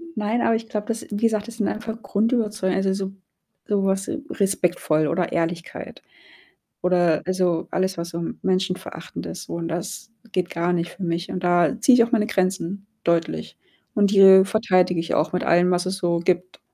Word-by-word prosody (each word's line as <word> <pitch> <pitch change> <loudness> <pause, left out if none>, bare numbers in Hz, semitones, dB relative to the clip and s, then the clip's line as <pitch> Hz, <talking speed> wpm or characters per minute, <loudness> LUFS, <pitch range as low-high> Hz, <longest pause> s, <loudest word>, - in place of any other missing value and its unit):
Nein, 215 +3 0
aber 230 - +3
ich 225 0 -5
glaube, 210 -1 -4
das 230 -1 -4
wie - - -3
gesagt, 215 -1 +1
das 235 0 -10
sind 215 - 0
einfach 225 0 -5
Grundüberzeugungen, 215 -4 0
also, 190 - +2
so 195 0 -4 0.5
sowas 195 -1 0 0.2
respektvoll 175 -5 +1
oder 175 +3 -1
Ehrlichkeit 170 0 -4 0.8
oder 175 -3 +2
also, 180 -3 0
alles, 190 -1 -1
was 170 0 -4
so 170 0 -4 0.2
menschenverachtend 185 -1 -3
ist, - - -7
so - - -7
und 170 -1 -3
das 170 +6 -5 0.2
geht 180 -2 -1
gar 170 +1 0
nicht 170 -1 -1
für - - -11
mich. 170 +1 -2
Und 180 - -4
da 175 -2 +3
ziehe 260 - +6
ich 230 - +6
auch 235 - -8
meine 215 -4 +3
Grenzen 190 0 -1 0.2
deutlich 165 - -1 0.4
und 205 -1 +3
die 190 -1 +8
verteidige 185 -5 +2
ich 165 - -2
auch 155 - +1
mit 180 - -1
allem, 175 +1 +4
was 180 0 +1
es 185 +1 -1
so 170 -2 +1
gibt. 180 +1 -1
185 Hz, 185 wpm, -23 LUFS, 175-205 Hz, 0.8 s, die